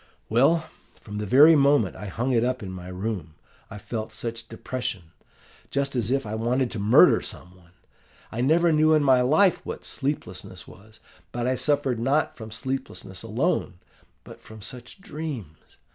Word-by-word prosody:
"'Well, 155 Hz, +8 st, +3 dB, 0.3 s
from 105 Hz, 0 st, -8 dB
the 105 Hz, -, -3 dB
very 150 Hz, +9 st, +7 dB
moment 140 Hz, -8 st, +3 dB
I 100 Hz, +2 st, -7 dB
hung 120 Hz, +7 st, -2 dB
it 120 Hz, -2 st, +2 dB
up 125 Hz, -1 st, -1 dB
in 95 Hz, -, -6 dB
my 90 Hz, -1 st, -8 dB
room 90 Hz, -4 st, -5 dB, 0.3 s
I -, -, -8 dB
felt 110 Hz, +2 st, -5 dB
such 115 Hz, -1 st, -6 dB
depression 110 Hz, -7 st, -5 dB, 0.6 s
just 140 Hz, 0 st, -2 dB
as 120 Hz, -3 st, -1 dB
if 135 Hz, 0 st, 0 dB
I 105 Hz, -, -5 dB
wanted 120 Hz, +3 st, 0 dB
to 110 Hz, -, -5 dB
murder 105 Hz, +3 st, +6 dB
some 90 Hz, 0 st, -10 dB
one. 85 Hz, -1 st, -23 dB, 0.6 s
I 115 Hz, -, -3 dB
never 165 Hz, +6 st, +3 dB
knew 155 Hz, +1 st, +4 dB
in 155 Hz, -1 st, +4 dB
my 130 Hz, -2 st, +5 dB
life 160 Hz, +9 st, +3 dB
what -, -, -7 dB
sleeplessness 95 Hz, -11 st, -4 dB
was; 110 Hz, +4 st, -17 dB, 0.3 s
but 120 Hz, 0 st, -3 dB
I 130 Hz, -, +2 dB
suffered 135 Hz, -2 st, 0 dB
not 135 Hz, +6 st, +1 dB
from 110 Hz, -2 st, -9 dB
sleeplessness 115 Hz, -5 st, -5 dB
alone, 115 Hz, -, -1 dB, 0.5 s
but -, -, -13 dB
from 110 Hz, 0 st, -13 dB
such 125 Hz, -, -10 dB
dreams! 140 Hz, -, -7 dB
120 Hz, 170 wpm, -25 LUFS, 105-140 Hz, 0.6 s, very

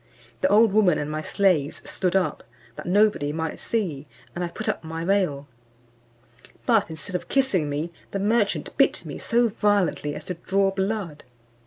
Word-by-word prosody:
The -, -, +4 dB
old 215 Hz, +1 st, +5 dB
woman 200 Hz, -6 st, +4 dB
and 150 Hz, +1 st, -3 dB
my 155 Hz, 0 st, -2 dB
slaves 175 Hz, -5 st, +1 dB
stood 185 Hz, -1 st, -1 dB
up, 190 Hz, -1 st, 0 dB, 0.3 s
that -, -, -8 dB
nobody 200 Hz, -6 st, +3 dB
might 160 Hz, +1 st, -3 dB
see, 165 Hz, -11 st, -2 dB, 0.3 s
and 180 Hz, -, -3 dB
I -, -, -1 dB
put 170 Hz, -, -7 dB
up -, -, -1 dB
my 160 Hz, +1 st, -5 dB
veil; 180 Hz, -8 st, +1 dB, 1.2 s
but 225 Hz, -7 st, +3 dB
instead 160 Hz, +4 st, -6 dB
of 175 Hz, -1 st, -3 dB
kissing 205 Hz, -, +1 dB
me, 155 Hz, +4 st, -3 dB, 0.2 s
the -, -, -3 dB
merchant 210 Hz, +1 st, 0 dB
bit -, -, +3 dB
me -, -, -6 dB
so 235 Hz, 0 st, +2 dB
violently 200 Hz, -8 st, +1 dB
as -, -, -8 dB
to 180 Hz, -, -3 dB
draw 195 Hz, +3 st, +1 dB
blood. 195 Hz, -5 st, -3 dB
185 Hz, 170 wpm, -24 LUFS, 160-205 Hz, 1.2 s, old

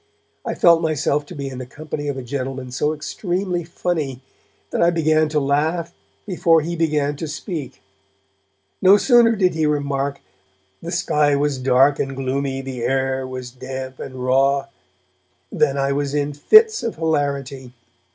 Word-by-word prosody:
I -, -, -3 dB
felt 170 Hz, -1 st, +5 dB
myself 150 Hz, -2 st, 0 dB
to 180 Hz, -, -9 dB
be 140 Hz, -2 st, -5 dB
in 130 Hz, -1 st, -7 dB
the 130 Hz, -, -6 dB
company 145 Hz, +1 st, -6 dB
of 140 Hz, -2 st, -2 dB
a 130 Hz, -, -5 dB
gentleman 130 Hz, 0 st, -5 dB
so 150 Hz, +4 st, 0 dB
extremely 175 Hz, +3 st, -3 dB
funny 155 Hz, -6 st, -3 dB, 0.5 s
that -, -, -1 dB
I 170 Hz, -, +5 dB
began 155 Hz, -2 st, +2 dB
to 150 Hz, 0 st, +1 dB
laugh 155 Hz, +4 st, 0 dB, 0.3 s
before 170 Hz, -4 st, +3 dB
he 170 Hz, +3 st, -4 dB
began 150 Hz, -3 st, 0 dB
to 160 Hz, -, -4 dB
speak; 155 Hz, 0 st, -6 dB, 1.0 s
no 190 Hz, +2 st, +7 dB
sooner 235 Hz, 0 st, +5 dB
did 185 Hz, -3 st, +2 dB
he 160 Hz, -1 st, +1 dB
remark 140 Hz, -1 st, -1 dB, 0.6 s
'the 165 Hz, -, -6 dB
sky 150 Hz, -5 st, +2 dB
was 140 Hz, -1 st, 0 dB
dark 135 Hz, +2 st, +3 dB
and 135 Hz, -1 st, -2 dB
gloomy, 135 Hz, 0 st, -2 dB
the 130 Hz, -2 st, -6 dB
air 130 Hz, +1 st, 0 dB
was 130 Hz, -1 st, -7 dB
damp 130 Hz, +1 st, -7 dB
and 130 Hz, -, -7 dB
raw,' 135 Hz, +2 st, +1 dB, 0.8 s
than 140 Hz, 0 st, +1 dB
I 140 Hz, 0 st, +1 dB
was 140 Hz, 0 st, -1 dB
in 145 Hz, 0 st, -1 dB
fits 435 Hz, -, +5 dB
of 230 Hz, -, -3 dB
hilarity. 140 Hz, -5 st, -2 dB
145 Hz, 160 wpm, -21 LUFS, 135-160 Hz, 1.0 s, no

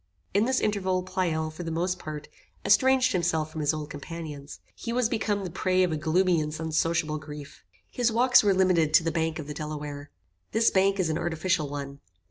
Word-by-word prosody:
In 205 Hz, +3 st, +3 dB
this 260 Hz, +1 st, +1 dB
interval, 190 Hz, -3 st, 0 dB
Pleyel, 165 Hz, -4 st, -1 dB
for 155 Hz, -, -9 dB
the 165 Hz, -, -4 dB
most 180 Hz, +3 st, -1 dB
part, 150 Hz, -1 st, -7 dB, 0.4 s
estranged 260 Hz, +4 st, +4 dB
himself 165 Hz, -4 st, 0 dB
from 160 Hz, -, -5 dB
his 150 Hz, -, +2 dB
old 155 Hz, -2 st, -5 dB
companions. 150 Hz, -1 st, -8 dB
He 230 Hz, -, -6 dB
was 245 Hz, -1 st, +2 dB
become 210 Hz, -3 st, -1 dB
the 180 Hz, -, -5 dB
prey 185 Hz, +1 st, +1 dB
of 180 Hz, -, +1 dB
a -, -, 0 dB
gloomy 165 Hz, +2 st, +2 dB
and 150 Hz, +1 st, -4 dB
unsociable 160 Hz, -1 st, 0 dB
grief. 150 Hz, -1 st, -10 dB, 0.3 s
His 240 Hz, -2 st, +1 dB
walks 245 Hz, +2 st, +5 dB
were 205 Hz, -, +4 dB
limited 175 Hz, -5 st, +3 dB
to 165 Hz, -, +6 dB
the 165 Hz, -, 0 dB
bank 160 Hz, 0 st, -1 dB
of 155 Hz, -, -6 dB
the 150 Hz, -, -6 dB
Delaware. 150 Hz, -1 st, -6 dB, 0.4 s
This 225 Hz, +1 st, +4 dB
bank 195 Hz, +1 st, +2 dB
is 170 Hz, -4 st, +1 dB
an 155 Hz, -, -1 dB
artificial 160 Hz, -2 st, -1 dB
one. 140 Hz, -1 st, -6 dB
165 Hz, 200 wpm, -27 LUFS, 155-190 Hz, 0.4 s, to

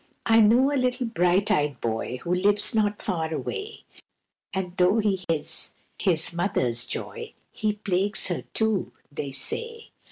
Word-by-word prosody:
I 225 Hz, 0 st, +5 dB
KNOW 240 Hz, +6 st, +5 dB
a 285 Hz, -, +1 dB
little 250 Hz, 0 st, 0 dB
bright 190 Hz, -3 st, +2 dB
eyed 145 Hz, -3 st, 0 dB
boy 115 Hz, +2 st, -3 dB
Who 175 Hz, -, -1 dB
lives 200 Hz, +3 st, +3 dB
not 210 Hz, -2 st, +1 dB
far 165 Hz, -5 st, -2 dB
away, 420 Hz, -, -5 dB, 0.7 s
And 185 Hz, -2 st, -4 dB
though 180 Hz, +4 st, +4 dB
he 205 Hz, -3 st, +1 dB
is 160 Hz, -3 st, -1 dB, 0.3 s
his 170 Hz, -4 st, +3 dB
mother's 125 Hz, -, 0 dB
joy, -, -, -5 dB, 0.2 s
He 215 Hz, -1 st, -1 dB
plagues 200 Hz, -1 st, 0 dB
her, 175 Hz, -3 st, -2 dB
too, 220 Hz, -3 st, 0 dB, 0.2 s
they 140 Hz, -1 st, -5 dB
say. 460 Hz, -, -2 dB
195 Hz, 150 wpm, -25 LUFS, 165-220 Hz, 0.7 s, I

